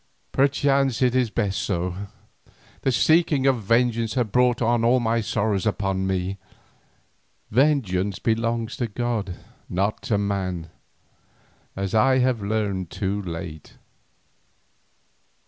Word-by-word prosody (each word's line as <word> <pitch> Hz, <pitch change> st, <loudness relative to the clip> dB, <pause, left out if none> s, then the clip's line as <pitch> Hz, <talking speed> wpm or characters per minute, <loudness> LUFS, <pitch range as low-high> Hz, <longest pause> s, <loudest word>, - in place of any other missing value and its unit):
Perchance 135 Hz, -2 st, +2 dB
it 125 Hz, -1 st, +3 dB
is 125 Hz, -2 st, +2 dB
best 105 Hz, -3 st, -1 dB
so. 90 Hz, +1 st, -3 dB, 0.7 s
The 135 Hz, -, +1 dB
seeking 155 Hz, +1 st, +3 dB
of 130 Hz, -4 st, +3 dB
vengeance 115 Hz, +2 st, +1 dB
has 125 Hz, -2 st, +2 dB
brought 125 Hz, +3 st, +2 dB
all 120 Hz, +1 st, +3 dB
my 115 Hz, -1 st, +1 dB
sorrows 105 Hz, -1 st, 0 dB
upon 95 Hz, -2 st, -1 dB
me; 95 Hz, +1 st, -2 dB, 1.1 s
vengeance 105 Hz, -8 st, +2 dB
belongs 115 Hz, 0 st, -1 dB
to 120 Hz, -, -1 dB
God 115 Hz, -2 st, -2 dB
and 90 Hz, -, -7 dB, 0.3 s
not 100 Hz, +4 st, -1 dB
to 105 Hz, -, 0 dB
man, 95 Hz, -5 st, -2 dB, 1.0 s
as 95 Hz, -1 st, -3 dB
I 130 Hz, +4 st, +4 dB
have 125 Hz, -3 st, +1 dB
learned 100 Hz, -4 st, -2 dB
too 100 Hz, +1 st, -2 dB
late." 85 Hz, -4 st, -7 dB
110 Hz, 115 wpm, -24 LUFS, 95-125 Hz, 1.1 s, I